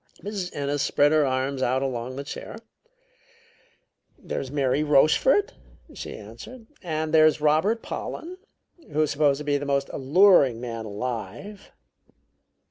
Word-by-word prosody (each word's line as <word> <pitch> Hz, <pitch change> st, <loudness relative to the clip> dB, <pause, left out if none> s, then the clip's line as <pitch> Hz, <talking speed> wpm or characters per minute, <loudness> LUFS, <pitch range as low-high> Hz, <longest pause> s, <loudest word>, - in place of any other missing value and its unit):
Mrs. 200 Hz, -3 st, -4 dB
Ennis 145 Hz, 0 st, -2 dB
spread 145 Hz, 0 st, +3 dB
her 155 Hz, -2 st, +3 dB
arms 130 Hz, +1 st, -1 dB
out 130 Hz, +1 st, +1 dB
along 130 Hz, -1 st, -4 dB
the 140 Hz, -, -5 dB
chair. 140 Hz, -, -8 dB, 1.6 s
"There's 135 Hz, -, -5 dB
Mary 140 Hz, +1 st, 0 dB
Rochefort," 155 Hz, -, +3 dB, 0.4 s
she -, -, -7 dB
answered, 250 Hz, -3 st, -11 dB, 0.2 s
"and 155 Hz, -3 st, -3 dB
there's 155 Hz, -1 st, +5 dB
Robert 155 Hz, +10 st, +2 dB
Pollen, 360 Hz, +3 st, -6 dB, 0.5 s
who's 155 Hz, 0 st, +1 dB
supposed 145 Hz, -1 st, +2 dB
to 150 Hz, -, -6 dB
be 145 Hz, -1 st, 0 dB
the 145 Hz, -, -5 dB
most 140 Hz, 0 st, 0 dB
alluring 140 Hz, -, +4 dB
man 115 Hz, -2 st, -6 dB
alive." 120 Hz, -, -6 dB
145 Hz, 125 wpm, -25 LUFS, 130-160 Hz, 1.6 s, there's